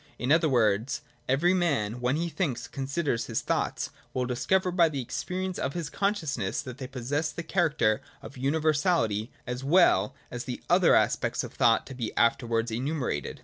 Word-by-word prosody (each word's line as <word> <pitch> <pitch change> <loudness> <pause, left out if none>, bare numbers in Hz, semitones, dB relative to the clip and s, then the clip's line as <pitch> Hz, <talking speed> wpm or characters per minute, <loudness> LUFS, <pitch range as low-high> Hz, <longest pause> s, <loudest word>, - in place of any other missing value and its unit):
In 125 +3 -1
other 160 0 +4
words, 115 -1 +1 0.3
every 160 +8 +3
man, 125 - 0
when 125 +2 +1
he 170 +2 -1
thinks 140 -9 -2
and - - -15
considers 135 -2 -2
his 115 - -1
thoughts, - - -1 0.2
will 125 -1 0
discover 180 +10 +1
by 170 -2 +4
the 140 -3 -4
experience 185 +9 -3
of 140 - -2
his 165 -4 -4
consciousness 160 - -1
that 130 -1 -8
they 130 - -5
possess 135 +5 -2
the 170 - -6
character 150 - +1 0.2
of - - -10
universality 145 - +1
as 125 +1 -4
well 135 - +4 0.2
as 120 0 -5
the 125 - -6
other - - +6
aspects - - +1
of - - -8
thought 115 0 +3
to 135 - -9
be 120 -4 -4
aftenvards 115 -1 +1
enumerated. 130 - -2
135 Hz, 175 wpm, -28 LUFS, 120-165 Hz, 0.3 s, other